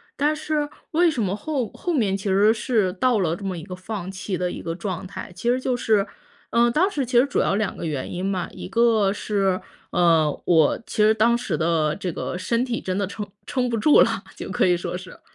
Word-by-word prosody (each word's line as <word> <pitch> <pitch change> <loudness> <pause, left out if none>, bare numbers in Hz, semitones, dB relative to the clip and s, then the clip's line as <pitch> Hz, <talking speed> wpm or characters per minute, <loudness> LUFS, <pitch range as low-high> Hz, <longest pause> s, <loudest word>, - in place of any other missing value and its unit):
但 295 +2 +1
是， 305 -1 -2 0.2
为 340 +1 +4
什 265 -7 -2
么 190 -1 -1
后 255 0 -2
后 350 - -3
面 210 -9 +1
其 195 - -6
实 205 +3 +5
是 220 -4 +1
到 235 +3 +2
了 165 -2 +1
这 205 - -11
么 185 -2 -3
一 160 - -7
个 185 - -8
放 190 0 -6
弃 190 0 -4
的 180 0 -1
一 - - -6
个 165 0 -4
状 185 -1 -4
态， 190 - -8
其 235 +6 -2
实 250 +1 +2
就 255 -1 0
是 215 -4 +2 0.4
呃， 235 0 +3
当 365 +9 +2
时 280 -7 -1
其 245 0 +1
实 245 - +6
主 - - -1
要 - - +2
两 210 -1 -1
个 - - -5
原 145 -5 -3
因 180 +2 -3
嘛， 190 -3 -2
一 - - -8
个 215 -1 +3
是， 195 -3 0 0.3
呃， 165 -3 +4 0.2
我 160 -4 +4
其 - - -8
实 215 +1 +6
当 230 +2 +3
时 185 -10 -2
的 160 -2 +1
这 185 -3 -3
个 175 - -4
身 235 +6 0
体 235 -2 -3
真 185 0 -2
的 200 -2 0
撑 205 +1 -5 0.2
撑 250 -1 0
不 230 - -1
住 290 +8 +6
了， - - +1
就 - - -7
可 - - +2
以 180 - +4
说 175 +1 -4
是。 185 0 -11
205 Hz, 260 characters per minute, -23 LUFS, 180-240 Hz, 0.4 s, 实